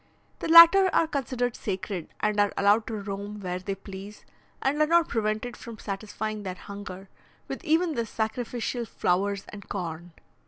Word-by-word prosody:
The -, -, -3 dB
latter 335 Hz, +4 st, +9 dB
are -, -, +4 dB
considered 255 Hz, -5 st, -2 dB
sacred, 190 Hz, -3 st, -4 dB
and 210 Hz, -1 st, +1 dB
are 205 Hz, -1 st, +3 dB
allowed 205 Hz, +2 st, +3 dB
to 225 Hz, -, -3 dB
roam 200 Hz, +1 st, -6 dB
where 180 Hz, -2 st, -3 dB
they 195 Hz, +1 st, -4 dB
please, 195 Hz, +1 st, -10 dB, 0.3 s
and 285 Hz, +3 st, 0 dB
are 305 Hz, -, +4 dB
not 335 Hz, +1 st, +4 dB
prevented 220 Hz, +1 st, -1 dB
from 230 Hz, -2 st, -10 dB
satisfying 215 Hz, +1 st, -4 dB
their 185 Hz, -2 st, -5 dB
hunger 195 Hz, -1 st, -9 dB, 0.4 s
with -, -, -6 dB
even 325 Hz, +1 st, +2 dB
the 235 Hz, -4 st, -2 dB
sacrificial 235 Hz, +2 st, -3 dB
flowers 195 Hz, 0 st, 0 dB
and 205 Hz, -2 st, -11 dB
corn. 170 Hz, -2 st, -5 dB
210 Hz, 160 wpm, -27 LUFS, 195-245 Hz, 0.4 s, latter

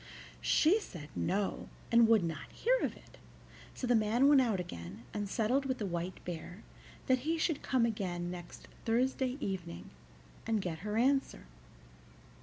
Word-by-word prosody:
She 355 Hz, +8 st, +4 dB
said 165 Hz, -, -9 dB
no, 195 Hz, +3 st, -1 dB, 0.2 s
and 235 Hz, -1 st, +7 dB
would 220 Hz, -4 st, +5 dB
not 160 Hz, -5 st, -4 dB
hear -, -, +2 dB
of -, -, -2 dB
it; -, -, -18 dB, 0.6 s
so -, -, -3 dB
the 245 Hz, -, +3 dB
man 225 Hz, +4 st, +4 dB
went 285 Hz, -2 st, +7 dB
out 225 Hz, -7 st, +1 dB
again, 95 Hz, -, -7 dB
and 205 Hz, -2 st, -3 dB
settled 245 Hz, +7 st, +1 dB
with 260 Hz, -1 st, -1 dB
the 210 Hz, -, -3 dB
White 175 Hz, 0 st, -4 dB
Bear 175 Hz, +3 st, -6 dB, 0.4 s
that 255 Hz, -1 st, +3 dB
he 320 Hz, +6 st, -1 dB
should 320 Hz, -2 st, 0 dB
come 255 Hz, -3 st, +2 dB
again 180 Hz, -6 st, -2 dB
next 175 Hz, -1 st, -9 dB, 0.2 s
Thursday 255 Hz, +2 st, +1 dB
evening, 180 Hz, -, -5 dB, 0.6 s
and 225 Hz, -1 st, +2 dB
get 175 Hz, -4 st, -3 dB
her 210 Hz, +3 st, -3 dB
answer. 270 Hz, +3 st, +1 dB
215 Hz, 160 wpm, -33 LUFS, 175-255 Hz, 0.6 s, and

